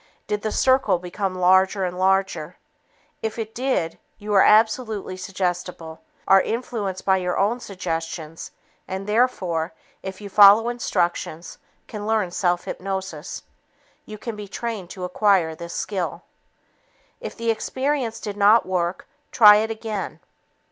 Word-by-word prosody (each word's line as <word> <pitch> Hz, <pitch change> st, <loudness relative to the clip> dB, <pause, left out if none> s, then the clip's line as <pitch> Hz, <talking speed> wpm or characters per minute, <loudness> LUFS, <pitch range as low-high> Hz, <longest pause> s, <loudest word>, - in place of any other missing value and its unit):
Did 210 Hz, -1 st, -2 dB
the 215 Hz, -, -2 dB
circle 260 Hz, -5 st, +3 dB
become 185 Hz, +2 st, -4 dB
larger 190 Hz, +2 st, +3 dB
and 180 Hz, 0 st, -4 dB
larger? 185 Hz, -3 st, 0 dB, 0.6 s
If 220 Hz, 0 st, -3 dB
it 220 Hz, -1 st, -5 dB
did, 245 Hz, -10 st, -1 dB, 0.2 s
you 210 Hz, 0 st, -4 dB
are 195 Hz, -, +6 dB
absolutely 220 Hz, -2 st, +3 dB
suggestible, 180 Hz, -3 st, -4 dB, 0.3 s
are 195 Hz, 0 st, +7 dB
influenced 220 Hz, -5 st, -3 dB
by 190 Hz, -1 st, +4 dB
your 180 Hz, -1 st, -2 dB
own 215 Hz, +5 st, +1 dB
suggestions 165 Hz, -5 st, -5 dB, 0.4 s
and, 190 Hz, +1 st, -5 dB
therefore, 190 Hz, -7 st, 0 dB, 0.3 s
if 190 Hz, 0 st, -7 dB
you 205 Hz, -, -8 dB
follow 205 Hz, +3 st, +7 dB
instructions, 175 Hz, -7 st, -2 dB, 0.3 s
can 210 Hz, -1 st, -7 dB
learn 215 Hz, -5 st, +1 dB
self 175 Hz, -1 st, 0 dB
hypnosis. 190 Hz, -4 st, -5 dB, 0.6 s
You 215 Hz, -, -8 dB
can 230 Hz, +1 st, -6 dB
be 210 Hz, -1 st, -8 dB
trained 210 Hz, -3 st, -5 dB
to 185 Hz, -1 st, -8 dB
acquire 180 Hz, -3 st, +2 dB
this 170 Hz, +1 st, -8 dB
skill. 190 Hz, -4 st, -3 dB, 1.0 s
If -, -, -8 dB
the 230 Hz, -1 st, +1 dB
experience 260 Hz, 0 st, -2 dB
did 205 Hz, -2 st, -6 dB
not 210 Hz, +3 st, +5 dB
work, 180 Hz, -1 st, -2 dB, 0.2 s
try 210 Hz, -3 st, +8 dB
it 220 Hz, +1 st, 0 dB
again. 220 Hz, -2 st, -5 dB
195 Hz, 135 wpm, -23 LUFS, 180-220 Hz, 1.0 s, try